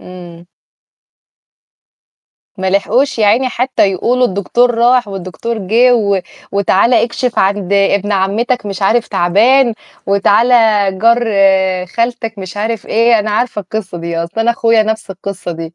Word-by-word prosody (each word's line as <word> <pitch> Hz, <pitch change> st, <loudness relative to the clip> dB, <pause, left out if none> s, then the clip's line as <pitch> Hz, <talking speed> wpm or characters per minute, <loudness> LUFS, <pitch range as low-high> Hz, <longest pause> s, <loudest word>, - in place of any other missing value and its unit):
إمم. 175 Hz, -1 st, -12 dB, 2.1 s
ما 190 Hz, 0 st, -1 dB
لحقوش 230 Hz, +7 st, 0 dB
يا 210 Hz, -, +2 dB
عيني 250 Hz, +5 st, +2 dB
حتى 250 Hz, -5 st, 0 dB
يقولوا 250 Hz, +7 st, +1 dB
الدكتور 240 Hz, +5 st, 0 dB
راح 240 Hz, 0 st, +2 dB
والدكتور 195 Hz, +4 st, -5 dB
جِه 230 Hz, +6 st, +2 dB
و 200 Hz, -4 st, 0 dB, 0.3 s
وتعالَ 200 Hz, +4 st, +2 dB
اكشف 240 Hz, +1 st, -1 dB
عند 200 Hz, 0 st, 0 dB
ابن 200 Hz, +1 st, +1 dB
عمتك 210 Hz, +5 st, -1 dB
مش 195 Hz, -1 st, -5 dB
عارف 230 Hz, +4 st, +1 dB
تعبان، 230 Hz, +8 st, +2 dB, 0.3 s
وتعالَ 200 Hz, +4 st, +2 dB, 0.5 s
جار 235 Hz, +3 st, +3 dB, 0.6 s
خالتك 230 Hz, +1 st, -3 dB
مش 190 Hz, 0 st, -8 dB
عارف 220 Hz, +1 st, -3 dB
إيه، 230 Hz, 0 st, +2 dB
أنا 210 Hz, +1 st, -2 dB
عارفة 215 Hz, 0 st, -1 dB
القصّة 190 Hz, -2 st, -6 dB
دي 170 Hz, 0 st, -5 dB
أصل 170 Hz, +7 st, -4 dB
أنا 235 Hz, -, +2 dB
أخويا 230 Hz, -1 st, +2 dB
نَفْس 220 Hz, -2 st, -4 dB
القصّة 195 Hz, -1 st, -6 dB
دي، 165 Hz, 0 st, -8 dB
210 Hz, 135 wpm, -14 LUFS, 195-235 Hz, 2.1 s, جار